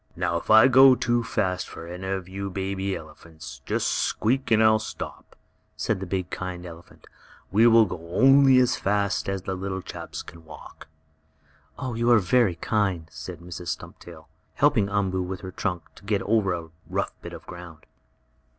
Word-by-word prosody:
"Now 85 - -1
if - - -8
I 110 +3 +8
go 130 0 +7
too 120 -1 0
fast 95 -5 -2
for 85 - -9
any 90 +2 -7
of 95 -2 -3
you 100 +1 -5
baby 95 0 -3
elephants, 80 -3 -11
just - - 0
squeak 130 +5 0
and 110 0 +4
I'll 110 0 +5
stop," 110 - -8 0.4
said - - -1
the 95 - -6
big, 90 -1 -3
kind 90 -1 -5
elephant. 85 -1 -13 0.5
"We 110 +5 +5
will 115 -1 +6
go 85 -3 -8
only 135 0 +6
as 125 -1 +3
fast 100 0 0
as 95 -1 -3
you 95 - -2
little 95 0 -4
chaps - - -7
can 80 - -13
walk." 80 -1 -13 0.9
"You 120 -2 -1
are 120 - +7
very 110 -1 +2
kind," 95 -4 -1
said 90 -3 -8
Mrs. 90 0 -8
Stumptail, 80 - -8 0.3
helping 100 -1 +3
Umboo, 95 -2 0
with 90 0 -5
her 95 - -7
trunk, 90 -3 -3
to - - -18
get 100 -1 -1
over 105 -3 +1
a 85 -1 -8 0.2
rough - - -2
bit - - -9
of - - -10
ground. 85 -3 -11
95 Hz, 175 wpm, -25 LUFS, 90-110 Hz, 0.9 s, I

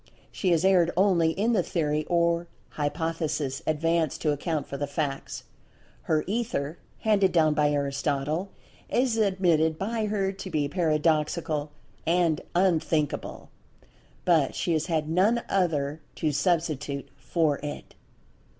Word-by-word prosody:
She 190 - -1
has 170 0 +3
erred 180 -3 +5
only 180 -4 +4
in 220 +6 +1
the 200 - +3
Theory 155 -3 -1
or[Pg - - -19
179] 170 0 +2 0.3
Hypothesis 150 -2 -2
advanced 160 0 +1
to 155 - +3
account 150 +1 -2
for - - -7
the 145 +1 -2
facts. 140 -1 -3 0.7
Her 155 -1 +3
"Ether" 195 - -2 0.2
handed 200 -4 +3
down 155 -3 +4
by 150 0 +2
Aristotle, 145 +4 -1 0.4
is 250 -2 +1
admitted 175 -6 +2
by 215 +3 -1
her 200 -2 0
to 190 -1 -8
be 150 -4 0
paradoxical 155 -2 0 0.4
and 170 -2 +2
"unthinkable"—but 160 -2 -1
she 170 - 0
has 155 +1 0
had 160 -3 0
none 200 +9 +2
other 155 -5 0
to 155 - 0
substitute 145 -2 -1
for 155 -4 0
it. 145 0 -7
160 Hz, 130 wpm, -27 LUFS, 150-185 Hz, 0.7 s, erred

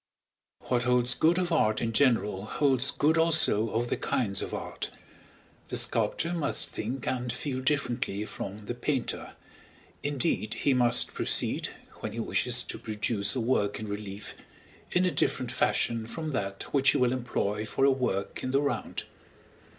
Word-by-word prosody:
What 125 -1 0
holds 125 0 +3
good 165 +2 +3
of 180 -1 0
art 110 -10 +2
in 115 -1 -2
general 110 -6 +2
holds 135 +2 +3
good 160 +4 +2
also 160 -9 +4
of 120 +2 -1
the - - +1
kinds 100 -6 -1
of - - -4
art. - - -4 0.8
The - - -1
sculptor 170 +2 +2
must 165 -4 +1
think 120 +4 -4
and 125 -1 -1
feel 130 +1 -3
differently 125 -7 -1
from 105 0 -7
the 120 - -3
painter, 125 +1 -2 0.7
indeed 135 -6 -1
he 140 - +2
must 120 -1 +4
proceed - - 0 0.3
when - - -5
he - - -5
wishes - - +1
to - - -6
produce 105 0 -1
a - - 0
work 110 -4 0
in 110 - -5
relief, 100 0 -6 0.6
in 180 +1 +3
a 180 - +2
different 130 -4 0
fashion 115 -1 0
from 160 +5 -5
that 100 -8 -3
which 135 -1 +4
he - - +3
will 125 0 +2
employ 110 -4 -2
for 135 - +1
a 140 - +6
work 125 -7 -2
in 130 - -2
the 135 +1 +3
round. 145 0 -2
125 Hz, 165 wpm, -28 LUFS, 110-140 Hz, 0.8 s, a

